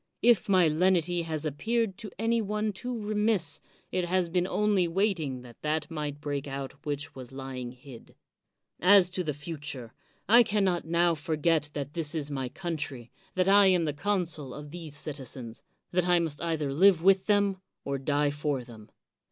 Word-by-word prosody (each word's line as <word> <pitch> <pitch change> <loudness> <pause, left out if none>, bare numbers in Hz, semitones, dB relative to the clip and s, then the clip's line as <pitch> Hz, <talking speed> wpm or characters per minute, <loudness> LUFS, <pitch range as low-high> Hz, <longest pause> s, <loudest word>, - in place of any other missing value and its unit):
If 230 -5 +4
my 185 -3 +5
lenity 175 +1 +2
has 160 -1 -3
appeared 220 - -1
to 220 -3 -6
any 230 +2 +1
one 210 0 -1
too 245 +5 -5
remiss, 210 -7 0 0.3
it 180 -1 0
has 180 0 +1
been 180 +1 +1
only 205 -3 +2
waiting 165 - -1
that 120 -2 -14
that 155 0 -1
might 150 -2 -4
break 145 -2 -3
out 135 -1 -5
which 145 0 -3
was 130 -2 -10
lying 130 -2 -6
hid. 125 -1 -14 0.6
As 185 -1 +6
to 185 0 -2
the 155 - -1
future, 145 -6 -5 0.3
I 235 +5 +8
can 210 -3 +1
not 180 -4 +1
now 170 +1 +3
forget 155 -1 0
that 145 0 -5
this 165 -2 -1
is 150 -2 -2
my 135 -3 -3
country, 145 -8 -4 0.2
that 185 0 +2
I 200 0 +7
am 180 -3 +3
the 150 - -1
con 195 +4 0
sul 150 -6 -5
of 150 0 -9
these 160 -4 -7
citizens, 130 -5 -5 0.3
that 180 0 +1
I 175 0 +5
must 165 -4 -2
either 155 -5 -1
live 180 +2 +5
with 190 0 +4
them, 200 -2 +2 0.2
or 140 -1 -2
die 145 +1 +1
for 145 -3 -2
them. 110 -3 -13
165 Hz, 180 wpm, -28 LUFS, 145-190 Hz, 0.6 s, I